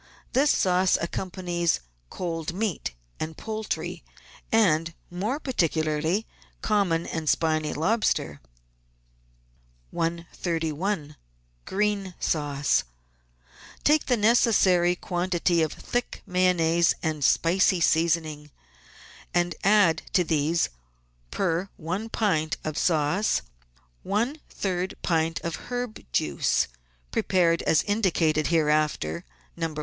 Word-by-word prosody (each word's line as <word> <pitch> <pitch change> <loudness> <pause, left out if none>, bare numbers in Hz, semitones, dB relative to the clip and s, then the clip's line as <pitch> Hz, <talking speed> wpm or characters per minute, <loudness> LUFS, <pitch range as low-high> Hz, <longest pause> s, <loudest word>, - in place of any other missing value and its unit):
This 275 +3 +4
sauce 185 -3 +3
accompanies 175 -1 -1 0.3
cold 165 -2 -4
meat 200 - -2 0.2
and 155 0 -4
poultry, 220 -1 -4 0.5
and, 170 -7 +3 0.2
more 210 +11 -2
particularly, 165 - 0 0.4
common 190 -6 +1
and 160 -2 -2
spiny 155 -2 +1
lobster. 160 - 0 1.5
131— 165 0 -2 0.5
GREEN 200 -2 -1
SAUCE 145 - +1 1.0
Take 300 +1 +3
the 245 - +3
necessary 200 -6 +4
quantity 175 -1 0
of 155 - +1
thick 245 0 -4
Mayonnaise 170 -2 +3
and 155 -3 -1
spicy 180 +5 +3
seasoning, 160 -2 +1 0.9
and 175 0 +2
add 195 -5 +4
to 180 - +4
these, 160 +1 +1 0.6
per 185 0 -1 0.4
pint 160 -7 0
of 155 -1 -3
sauce, 165 +6 +1 0.6
one 235 +10 -1
third 185 -1 -2
pint 165 -1 +1
of 170 +6 -5
herb 245 -3 -4
juice, 70 +3 +1 0.4
prepared 170 -3 +2
as 155 - +3
indicated 175 -7 +1
hereafter 150 - +1 0.3
(No. 165 -2 -3
170 Hz, 95 wpm, -26 LUFS, 160-195 Hz, 1.5 s, This